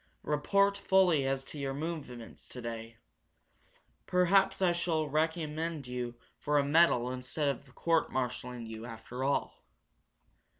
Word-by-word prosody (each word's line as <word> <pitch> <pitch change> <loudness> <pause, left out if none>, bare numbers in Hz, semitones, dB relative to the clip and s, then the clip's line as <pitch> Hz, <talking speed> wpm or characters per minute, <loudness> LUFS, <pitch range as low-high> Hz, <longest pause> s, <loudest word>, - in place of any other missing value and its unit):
"Report 200 +7 +2
fully 180 -9 +4
as 135 0 0
to 145 - -9
your 135 -1 -2
movements 140 -7 -6
today. 115 -2 -6 1.1
Perhaps 195 +2 +4
I 185 -2 +4
shall 165 -3 0
recommend 155 0 -1
you 125 -1 -4 0.2
for 150 0 +1
a 145 - +4
metal 140 -5 +4
instead 130 +3 -1
of 135 -2 -5
court 165 -1 +1
marshalling 125 -1 -3
you, 110 +1 -7
after 120 +2 -6
all." 140 +1 -1
145 Hz, 125 wpm, -32 LUFS, 125-165 Hz, 1.1 s, fully